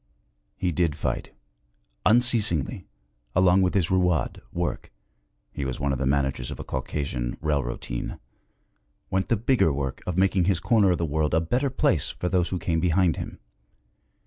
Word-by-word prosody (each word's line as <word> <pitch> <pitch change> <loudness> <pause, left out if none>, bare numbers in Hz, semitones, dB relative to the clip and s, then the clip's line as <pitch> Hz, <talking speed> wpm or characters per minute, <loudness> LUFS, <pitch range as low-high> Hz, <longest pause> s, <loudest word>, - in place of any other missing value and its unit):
He 90 - 0
did 85 -3 +1
fight. - - -3 0.8
Unceasingly, 110 - +2 0.5
along 95 +1 +5
with 90 +1 +1
his 95 -4 +1
rouad, 90 -4 +1
work, 85 -1 -3 0.6
he 70 - -5
was 65 0 -3
one 70 -1 0
of 65 - -3
the 70 - 0
managers 65 -3 0
of - - -7
a - - -4
Caucasian 65 -2 -3
railrotine 65 -5 -3 0.9
went 95 0 0
the 115 - +3
bigger 115 - +2
work 70 -1 -3
of 90 -1 -2
making 95 -1 +3
his 95 -2 +2
corner 105 +1 +3
of 90 - +2
the 85 - -1
world 75 0 0
a - - +4
better 125 - 0
place 95 - +1
for 90 - -3
those 90 -2 +1
who 95 - -2
came 85 -2 -1
behind 90 0 +2
him. - - -6
85 Hz, 165 wpm, -25 LUFS, 70-95 Hz, 0.9 s, along